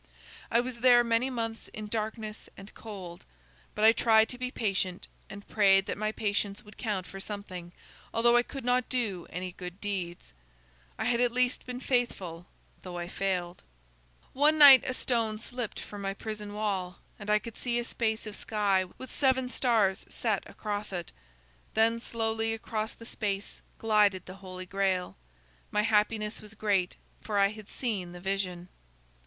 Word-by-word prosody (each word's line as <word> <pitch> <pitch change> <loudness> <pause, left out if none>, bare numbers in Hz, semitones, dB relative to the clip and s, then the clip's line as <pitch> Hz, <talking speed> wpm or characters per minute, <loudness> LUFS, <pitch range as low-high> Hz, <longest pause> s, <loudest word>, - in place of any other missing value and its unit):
"I 235 - +4
was 245 -1 -5
there 245 0 +7
many 235 +2 +2
months 225 -3 -4
in 215 - -5
darkness 215 0 -4
and 195 +1 -11
cold. 190 -6 -9 0.5
But 210 - +3
I 220 - +10
tried 220 -1 +4
to 250 - -5
be 250 0 -1
patient, 190 -6 -1 0.2
and 200 +1 -10
prayed 195 -2 +5
that - - -2
my 215 +1 -1
patience 205 -1 -1
would 210 0 -15
count 205 -5 -2
for 195 - -9
something, 190 -4 -7 0.4
although 235 +1 +4
I 240 - +7
could 265 +1 -8
not 250 0 +2
do 215 -9 -1
any 180 +1 -4
good 180 +1 -8
deeds. 185 - -4 0.6
I - - -2
had 235 0 +2
at 245 -1 +3
least 250 +1 +1
been 250 0 -4
faithful 195 -10 -1 0.3
though 180 -1 -7
I 175 0 -4
failed. 180 -2 -2 0.7
"One 300 +3 +4
night 280 -4 +10
a 255 - -1
stone 225 -4 0
slipped 235 0 -5
from 205 -1 -8
my 195 0 -2
prison 210 -1 -6
wall, 190 -4 -1 0.2
and 205 0 -7
I 210 - +5
could 230 +1 -7
see 240 -1 -1
a 240 - 0
space 220 -2 -1
of 215 -1 -6
sky, 200 -4 +1
with 260 - -8
seven 260 -2 +2
stars 220 -7 +2
set - - 0
across 210 -1 -4
it. 175 -3 -4 0.6
Then 225 +1 +4
slowly 225 -1 -1
across 220 0 -3
the 230 - -13
space 205 -4 -3 0.2
glided 210 -4 +3
the 185 - -8
Holy 185 -1 -7
Grail. 190 - 0 0.5
My 210 - +1
happiness 215 0 +1
was 215 0 -10
great, 200 -4 +1 0.3
for 210 -2 -2
I 200 0 +5
had 215 -1 -10
seen 195 -8 -2
the 175 - -8
vision. 185 -2 -2
215 Hz, 170 wpm, -30 LUFS, 195-230 Hz, 0.7 s, I